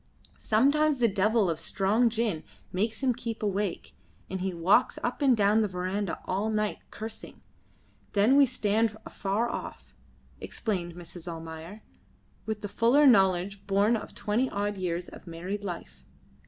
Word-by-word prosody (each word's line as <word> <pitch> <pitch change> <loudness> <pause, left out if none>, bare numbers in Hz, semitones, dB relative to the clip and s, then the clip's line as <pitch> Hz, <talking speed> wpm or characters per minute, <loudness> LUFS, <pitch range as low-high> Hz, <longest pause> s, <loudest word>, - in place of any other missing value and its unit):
"Sometimes 285 +6 +3
the 240 -2 +4
devil 210 +1 +2
of 165 -2 -1
strong 205 +7 +2
gin 220 -8 -1 0.3
makes 220 +6 -2
him 255 -2 +3
keep 230 -2 -5
awake, 200 -2 -2 0.4
and 190 -1 -3
he 190 0 -1
walks 180 +8 +3
up 245 - -2
and 265 -4 +4
down 210 +1 +4
the 215 - +2
verandah 185 +1 -3
all 200 +4 -1
night, 215 -1 -1
cursing; 220 +1 -8 0.7
then 215 +6 +4
we 280 -1 +7
stand 220 -2 +1
afar 205 +4 -1
off," - - -7 0.4
explained 180 -6 -3
Mrs. 175 0 -10
Almayer, 165 +5 -8 0.6
with 220 -1 -3
the 205 - -3
fuller 240 +8 +4
knowledge 195 -4 +3
born 200 +4 +3
of 215 - -6
twenty 235 +5 0
odd 205 +1 -2
years 180 -2 -3
of - - -13
married 180 +5 -5
life. 175 -4 -7
205 Hz, 150 wpm, -28 LUFS, 185-225 Hz, 0.7 s, we